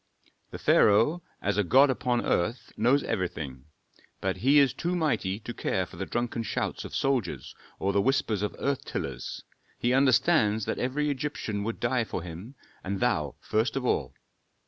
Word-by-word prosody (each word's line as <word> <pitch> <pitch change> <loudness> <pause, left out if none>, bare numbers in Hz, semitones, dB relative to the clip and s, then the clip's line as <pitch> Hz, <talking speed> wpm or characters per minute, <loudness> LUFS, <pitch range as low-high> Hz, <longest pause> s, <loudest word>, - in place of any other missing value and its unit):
"The - - -7
pharaoh, 115 +12 +4 0.2
as 100 +1 +1
a - - +4
god 135 +9 +5
upon 125 -1 0
earth, 110 +9 -1
knows 125 +6 +3
everything; 70 -8 -3 0.5
but 95 -1 -1
he 135 +9 +4
is 140 -4 +5
too 175 +1 -2
mighty 125 - 0
to 120 - -6
care 95 -4 -1
for 85 - -14
the 95 - -4
drunken 120 -1 -2
shouts 115 - -3
of - - -7
soldiers 130 -9 -1 0.2
or 100 +1 0
the 100 - +3
whispers 115 -4 +1
of 105 - -2
earth 140 -1 -1
tillers. - - -5 0.3
He 120 +1 +1
understands 130 -5 +3
that - - -2
every 145 +4 0
Egyptian 130 -7 -3
would 115 - -3
die 120 0 +1
for 95 - -5
him, 90 +10 -9 0.3
and 95 +1 -3
thou - - 0
first 110 +5 0
of 135 -2 -2
all." 70 - 0
115 Hz, 170 wpm, -28 LUFS, 100-135 Hz, 0.5 s, god